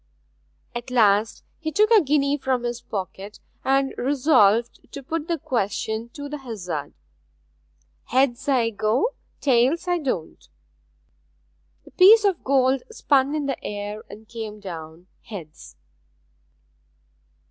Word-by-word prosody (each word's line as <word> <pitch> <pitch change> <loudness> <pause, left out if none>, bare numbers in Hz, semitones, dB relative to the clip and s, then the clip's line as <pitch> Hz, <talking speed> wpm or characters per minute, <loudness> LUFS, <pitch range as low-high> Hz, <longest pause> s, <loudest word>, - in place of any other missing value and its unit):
At 240 +1 -6
last 220 -3 +2 0.2
he 315 -1 -3
took 425 +6 +3
a 440 -3 +7
guinea 285 -1 +2
from 265 -3 -1
his 240 0 -3
pocket, 195 +1 -6 0.2
and 270 0 +1
resolved 245 -5 +2
to 280 - -7
put 320 +3 -3
the 340 -2 0
question 220 -2 -2
to 285 -1 -7
the 295 +1 -6
hazard. 180 - -6 1.1
'Heads 260 0 +1
I 240 -4 +2
go; 220 - +1 0.3
tails 270 +6 +2
I 355 -1 +1
don't.' 250 - -4 1.4
The - - -16
piece 415 +4 +7
of 385 -4 +1
gold 265 -1 +2
spun 285 -9 +1
in 300 -2 -2
the 275 -2 -3
air 205 +1 -5
and 215 +2 -12
came 220 -2 -7
down 165 -3 -9 0.2
heads. 155 - -10
250 Hz, 125 wpm, -23 LUFS, 210-285 Hz, 1.4 s, a